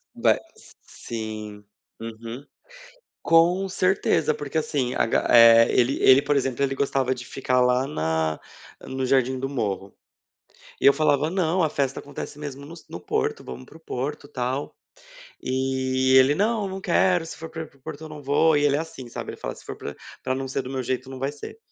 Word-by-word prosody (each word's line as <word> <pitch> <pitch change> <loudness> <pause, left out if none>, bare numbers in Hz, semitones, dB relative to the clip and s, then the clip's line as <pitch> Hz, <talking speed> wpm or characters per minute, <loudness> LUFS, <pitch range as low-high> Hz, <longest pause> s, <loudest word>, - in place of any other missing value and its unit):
ma - - +3
s - - -13
sim. 110 -2 -7 0.4
Uhum. 115 +4 -8 0.8
Com 175 +4 +4
certeza, 185 -4 +1
porque 145 +2 -3
assim, 140 -5 -1
a - - +2
ga - - +1
eh, 115 -1 +8
ele 125 +2 +2
ele, 130 +1 +7
por 145 0 +1
exemplo, 135 -1 0
ele 135 0 -1
gostava 135 -1 0
de 120 -1 -9
ficar 130 -1 0
lá 125 +1 +3
na 80 - -1 0.5
no 130 0 -3
Jardim 130 0 +2
do 135 +1 -3
Morro. 100 -7 -3 0.9
E - - -1
eu 140 - +8
falava: 155 0 +2
"Não, 180 -1 +1
a 155 - +2
festa 140 -3 -1
acontece 145 0 -8
mesmo 140 -1 -7
nos 165 +2 -12
no - - -7
Porto, - - -2
vamos 65 0 -8
para 160 - -15
o - - -19
Porto, 145 -1 -5
tal". 130 +2 -3 0.7
E 130 0 0
ele: 130 +2 +6
"Não, 210 +1 0
não 190 0 -6
quero, 180 -3 +2
se - - -8
for 165 0 -8
para 160 0 -5
ir - - -7
para 140 - -26
o 130 - -37
Porto 145 +2 -8
eu - - -8
não 150 -1 -9
vou", 145 +3 +3
e 145 - +2
ele 145 -1 +3
é - - 0
assim, 150 -6 -8
sabe, - - -6
ele - - -9
fala: - - -4
"Se - - -15
for - - -7
para 70 - -7 0.3
para 130 0 -1
não 135 0 -3
ser 135 0 -2
do 130 - -8
meu 130 -1 -2
jeito, 130 +2 -3
não 130 - -7
vai 135 +2 -2
ser". 145 - -10
135 Hz, 205 wpm, -24 LUFS, 125-150 Hz, 0.9 s, eh